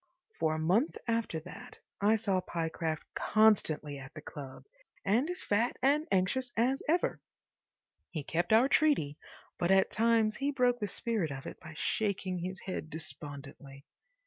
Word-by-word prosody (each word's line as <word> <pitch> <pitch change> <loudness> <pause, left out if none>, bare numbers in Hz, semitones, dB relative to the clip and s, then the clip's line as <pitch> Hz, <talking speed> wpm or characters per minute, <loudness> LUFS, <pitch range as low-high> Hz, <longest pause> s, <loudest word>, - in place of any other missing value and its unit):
For 155 -1 +2
a - - -2
month 185 - +2
after 230 -8 0
that 180 - -11 0.2
I 210 +2 +5
saw 200 -4 +1
Pyecraft 160 -2 -2
constantly 160 -10 +2
at 135 +1 -11
the 155 - -7
club 135 -4 -9 0.4
and 235 - +2
as 360 - -3
fat 225 +4 +1
and 290 +4 +2
anxious 240 +7 +1
as 255 +4 +2
ever. 345 +3 +1 0.9
He 155 -5 -4
kept 170 +9 -1
our 225 +4 +6
treaty, 275 - +2 0.4
but 175 - +1
at 190 0 +4
times 225 -1 +3
he 280 +1 0
broke 250 -3 +2
the 205 - -1
spirit 210 -4 -1
of 135 -1 -6
it - - -7
by 155 0 -11
shaking 195 -4 -1
his 185 +2 -5
head 185 -4 -5
despondently. 140 -2 -9
195 Hz, 155 wpm, -32 LUFS, 155-230 Hz, 0.9 s, our